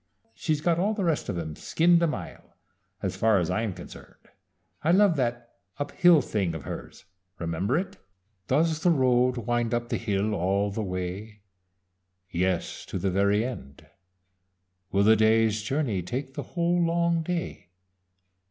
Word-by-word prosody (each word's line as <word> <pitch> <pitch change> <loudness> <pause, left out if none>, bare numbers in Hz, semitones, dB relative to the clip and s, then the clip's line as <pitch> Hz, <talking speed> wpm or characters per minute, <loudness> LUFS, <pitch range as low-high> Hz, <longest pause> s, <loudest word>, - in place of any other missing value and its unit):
"She's 155 +4 -1
got 170 +1 +1
all 210 +4 +1
the 205 - -2
rest 165 -9 0
of 95 - -2
'em 80 -2 -5
skinned 170 - +3
a 170 - +3
mile, 155 - -7 0.5
as 95 -1 -2
far 110 +2 +3
as 90 -1 0
I'm 110 +2 -1
concerned. 90 -1 -13 0.5
I 160 - +1
love 190 0 +5
that 120 -2 -2 0.2
'Up 145 +1 -4
Hill' 175 -6 +5
thing 95 -8 -1
of 80 - -6
hers - - -8 0.3
remember 90 - -1
it? 190 +2 -4 0.5
"Does 155 +3 +2
the 175 - +3
road 125 -4 +3
wind 120 0 0
up 120 0 -3
hill 105 -1 0
all 100 +2 0
the 110 - -3
way? 95 +2 -5 0.9
Yes, 90 0 -1
to - - -4
the 95 - -1
very 100 +3 +2
end. 70 - -8 1.1
Will 100 +1 +3
the 110 +2 +6
day's 110 0 +3
journey 115 -4 -1
take 130 +9 -5
the - - -4 0.2
whole 175 +1 +2
long 170 0 +1
day? 170 - -4
115 Hz, 155 wpm, -27 LUFS, 100-160 Hz, 1.1 s, the